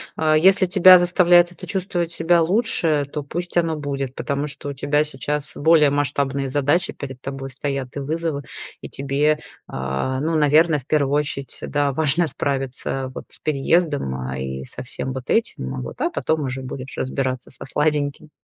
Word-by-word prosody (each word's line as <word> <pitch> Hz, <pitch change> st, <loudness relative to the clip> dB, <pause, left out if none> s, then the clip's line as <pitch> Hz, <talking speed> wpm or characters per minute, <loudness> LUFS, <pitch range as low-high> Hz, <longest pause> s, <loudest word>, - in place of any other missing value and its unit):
а, 155 Hz, -1 st, +2 dB
если 190 Hz, +4 st, +5 dB
тебя 185 Hz, 0 st, +8 dB
заставляет 175 Hz, -1 st, +4 dB
это 175 Hz, -, -11 dB
чувствовать 175 Hz, -3 st, -1 dB
себя 170 Hz, 0 st, +3 dB
лучше, 165 Hz, -6 st, +1 dB
то 150 Hz, -, -2 dB
пусть 175 Hz, +5 st, -5 dB
оно 165 Hz, -2 st, +2 dB
будет, 140 Hz, -3 st, -4 dB
потому 140 Hz, +1 st, -2 dB
что 145 Hz, 0 st, -7 dB
у -, -, -4 dB
тебя 145 Hz, +2 st, +1 dB
сейчас 145 Hz, 0 st, -3 dB
более 155 Hz, -1 st, +5 dB
масштабные 140 Hz, -1 st, 0 dB
задачи 145 Hz, +5 st, +1 dB
перед 130 Hz, -2 st, -8 dB
тобой 135 Hz, 0 st, -6 dB
стоят, 135 Hz, -1 st, -4 dB
и -, -, -3 dB
вызовы. 155 Hz, +1 st, -2 dB, 0.4 s
И -, -, -8 dB
тебе, 140 Hz, +3 st, +1 dB, 0.3 s
а, 65 Hz, -, -2 dB
ну, 160 Hz, +1 st, 0 dB
наверно, 155 Hz, +1 st, +4 dB
в 130 Hz, -, -18 dB
первую 145 Hz, -3 st, +1 dB
очередь, 145 Hz, -2 st, -1 dB
да, 145 Hz, -1 st, +1 dB
важно 155 Hz, +4 st, +1 dB
справиться 135 Hz, -2 st, -3 dB
вот -, -, -7 dB
с -, -, -17 dB
переездом, 150 Hz, -, +1 dB
а, 65 Hz, 0 st, -4 dB
и 65 Hz, 0 st, -4 dB
со -, -, -8 dB
всем 130 Hz, -, -5 dB
вот 130 Hz, -1 st, -7 dB
этим, 65 Hz, -, 0 dB
а, 65 Hz, -, -4 dB
вот, 65 Hz, -, -8 dB
а -, -, +2 dB
потом 160 Hz, -1 st, -1 dB
уже 130 Hz, 0 st, -4 dB
будешь 130 Hz, 0 st, -7 dB
разбираться 130 Hz, -1 st, -2 dB
со -, -, -10 dB
сладеньким. 150 Hz, +1 st, -1 dB
145 Hz, 175 wpm, -22 LUFS, 135-160 Hz, 0.4 s, тебя